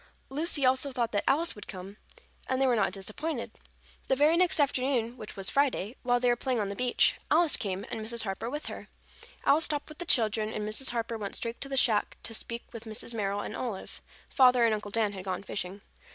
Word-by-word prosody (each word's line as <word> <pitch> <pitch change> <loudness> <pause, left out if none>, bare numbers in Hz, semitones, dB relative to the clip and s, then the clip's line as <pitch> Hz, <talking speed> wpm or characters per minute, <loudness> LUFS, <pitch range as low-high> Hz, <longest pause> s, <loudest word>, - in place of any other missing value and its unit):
Lucy 295 0 +1
also 260 +2 +3
thought 240 -3 -1
that 205 - 0
Alice 330 +5 +3
would 205 - -11
come, 195 +1 -8 0.5
and 260 - +1
they 270 - +4
were 250 -2 +3
not 210 -4 +2
disappointed. 215 - -4 0.6
The 265 - +3
very 300 +4 +4
next 350 -1 +3
afternoon, 255 -4 +1
which 215 -4 -9
was 195 -1 +2
Friday, 260 -6 +1
while 245 -1 +2
they 250 - +1
were 240 - +4
playing 250 0 -1
on 205 -2 -1
the 200 - -4
beach, 250 +1 +3
Alice 330 0 +5
came, 195 -1 -2
and 220 - -3
Mrs. 230 +1 -1
Harper 195 +3 -3
with 295 +4 -5
her. - - -7 0.6
Alice 310 +3 +5
stopped 300 -1 -2
with 305 - -12
the 350 - -4
children 220 -6 +2
and 210 -1 -3
Mrs. 220 +5 +1
Harper 230 -1 -3
went 200 -2 -4
straight 230 0 -4
to 275 - -4
the 270 - -2
shack 220 -5 +2
to 225 - -5
speak 235 +1 -3
with 230 0 -8
Mrs. 220 +1 -3
Merrill 205 -2 -1
and - - -5
Olive. 225 -7 -5 0.3
Father 250 -3 +5
and 225 - +3
Uncle 210 -1 -3
Dan 210 -1 0
had 190 -2 -7
gone 185 0 -3
fishing. 195 0 -5
235 Hz, 225 wpm, -29 LUFS, 210-270 Hz, 0.6 s, Alice